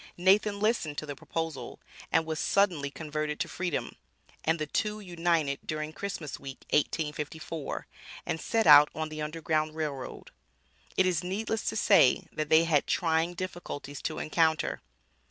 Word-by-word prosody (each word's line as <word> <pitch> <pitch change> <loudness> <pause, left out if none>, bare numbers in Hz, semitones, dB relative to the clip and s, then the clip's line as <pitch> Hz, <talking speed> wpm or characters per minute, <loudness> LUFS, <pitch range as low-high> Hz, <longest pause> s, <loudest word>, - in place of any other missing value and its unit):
Nathan 200 +3 +3
listened 205 -9 0
to - - -3
the 145 -1 -6
proposal, 160 +1 -5 0.3
and 160 - +3
was 160 -1 -3
suddenly 175 -8 +2
converted 150 0 -4
to - - -1
freedom, 180 -4 -3 0.5
and 160 +1 +2
the 155 - -2
two 210 +7 -1
united 170 -6 0
during 155 0 -4
Christmas 175 -7 -5
week, 135 -1 -9
1854, 150 +1 -2 0.4
and 160 - -2
set 225 -1 +1
out 150 +1 +9
on 155 0 -3
the 155 0 -6
Underground 155 0 -1
Rail 155 -2 -1
Road. 130 -2 -8 0.7
It 190 - +5
is 180 -2 +1
needless 210 +4 -2
to - - -5
say 195 - +5
that 155 -1 -3
they 160 +1 +6
had 155 -4 +2
trying 165 0 +1
difficulties 175 -6 -6
to 155 - -3
encounter. 160 0 +1
160 Hz, 155 wpm, -29 LUFS, 150-180 Hz, 0.7 s, out